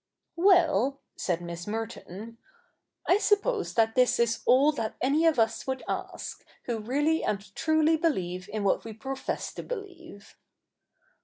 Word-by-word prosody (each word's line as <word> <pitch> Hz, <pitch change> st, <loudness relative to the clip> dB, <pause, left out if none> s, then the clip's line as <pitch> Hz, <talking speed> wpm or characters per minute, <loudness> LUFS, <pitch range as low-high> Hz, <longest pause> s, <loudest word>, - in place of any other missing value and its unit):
'Well,' 330 Hz, -7 st, +4 dB, 0.2 s
said 175 Hz, -2 st, -1 dB
Miss 170 Hz, +1 st, -6 dB
Merton, 225 Hz, 0 st, -6 dB, 0.7 s
'I 370 Hz, -, +5 dB
suppose 420 Hz, +1 st, +1 dB
that 225 Hz, -1 st, +3 dB
this 250 Hz, 0 st, +3 dB
is 235 Hz, -1 st, +1 dB
all 275 Hz, +4 st, +6 dB
that 225 Hz, -7 st, -4 dB
any 295 Hz, +6 st, +3 dB
of 320 Hz, -, +3 dB
us 225 Hz, +2 st, +1 dB
would 265 Hz, -1 st, -2 dB
ask, -, -, -5 dB, 0.2 s
who 235 Hz, -2 st, -2 dB
really 290 Hz, +8 st, +1 dB
and 200 Hz, -1 st, -3 dB
truly 315 Hz, +2 st, +2 dB
beheve 185 Hz, -, -1 dB
in 210 Hz, -1 st, -3 dB
what 195 Hz, -, +1 dB
we 225 Hz, -, -7 dB
profess 270 Hz, +5 st, -4 dB
to -, -, -6 dB
believe.' 355 Hz, -, -9 dB
255 Hz, 145 wpm, -28 LUFS, 215-320 Hz, 0.7 s, all